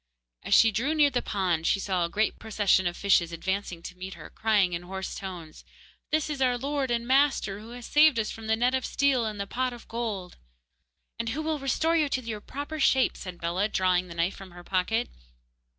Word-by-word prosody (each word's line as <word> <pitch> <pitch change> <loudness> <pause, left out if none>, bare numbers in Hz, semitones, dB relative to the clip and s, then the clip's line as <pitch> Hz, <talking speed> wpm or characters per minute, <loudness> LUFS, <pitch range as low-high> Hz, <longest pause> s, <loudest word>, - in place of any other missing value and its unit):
As - - +2
she 225 - +6
drew 255 +10 0
near 295 -2 +4
the 245 -2 0
pond 180 -5 -1
she 195 - +2
saw 185 -3 0
a 170 - -1
great 215 +5 0
procession 205 -4 +2
of 175 - -3
fishes 190 -4 +3
advancing 180 0 -3
to 180 - -8
meet 185 +1 -7
her, - - -11
crying 205 -5 +2
in 170 - -2
hoarse 190 +2 -5
tones: 175 -5 -8 0.5
'This 310 0 +1
is 280 -2 -4
our 250 -1 +3
lord 275 +1 -2
and 235 -1 0
master, 265 -7 +2
who 220 +2 -11
has 245 -1 -9
saved 300 -3 +5
us 220 -1 0
from 225 -1 -8
the 220 - +3
net 245 +3 +1
of 260 -1 0
steel 260 -4 +1
and 210 -1 -5
the 200 - -2
pot 255 +4 -2
of 240 - -12
gold!' 215 -6 -4 0.8
'And 230 0 -2
who 295 +7 -3
will 310 -1 -1
restore 315 +5 +1
you 305 -3 +2
to 260 - -1
your 220 -3 -5
proper 290 +6 -6
shapes,' 265 -2 +3
said 180 -2 -7
Bellah, 175 +5 -1
drawing 185 -2 +1
the 170 - -9
knife 170 +3 0
from 195 -1 -11
her 175 0 -12
pocket. 195 +6 0
220 Hz, 220 wpm, -27 LUFS, 185-260 Hz, 0.8 s, she